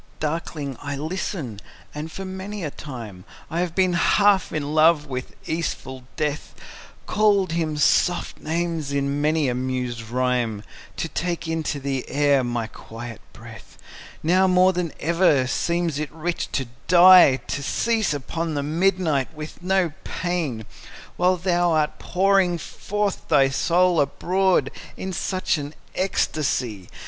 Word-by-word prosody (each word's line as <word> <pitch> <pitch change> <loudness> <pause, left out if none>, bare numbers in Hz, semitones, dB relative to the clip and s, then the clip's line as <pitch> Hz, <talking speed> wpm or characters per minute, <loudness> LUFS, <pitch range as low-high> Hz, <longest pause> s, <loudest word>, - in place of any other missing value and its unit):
Darkling 150 -3 -3
I 145 -1 -4
listen; 155 - -4 0.3
and, 150 +2 -6
for 195 - -6
many 190 +1 -6
a 150 - -3
time 115 -12 -8 0.3
I 165 - -1
have 175 -1 -2
been 185 -2 +3
half 200 +3 +3
in 150 -1 -3
love 155 -1 +5
with 130 -3 -6
easeful 130 -5 -4
Death, 150 -1 -3 0.5
Called 205 -4 +2
him 160 -2 -1
soft 175 +4 +2
names 165 -2 -2
in 140 0 -1
many 155 -1 +2
a 125 - 0
mused 125 -3 -3
rhyme, 125 -4 0 0.3
To - - -2
take 170 0 -3
into 160 -3 -2
the 135 -1 -3
air 140 -1 +3
my 120 -2 -2
quiet 115 +1 -9
breath; - - -13 0.5
Now 185 +4 +4
more 185 0 +4
than 175 -3 -2
ever 165 -5 +3
seems 170 +2 -1
it 155 -1 -4
rich 170 +2 -3
to 135 - 0 0.2
die, 180 -5 +8
To 140 - -2
cease 220 +8 0
upon 160 +3 -3
the 145 - -1
midnight 160 -3 +1
with 155 +2 -8
no 185 -2 +1
pain, 160 - -3 0.5
While 180 +1 +2
thou 175 -1 +1
art 155 -1 0
pouring 190 -1 +2
forth 205 +4 -3
thy 140 -4 +4
soul 175 +3 +3
abroad 180 +1 +1 0.3
In 190 0 -4
such 185 -2 -1
an 145 +1 -7 0.2
ecstasy! 130 - -1
160 Hz, 140 wpm, -23 LUFS, 140-180 Hz, 0.5 s, die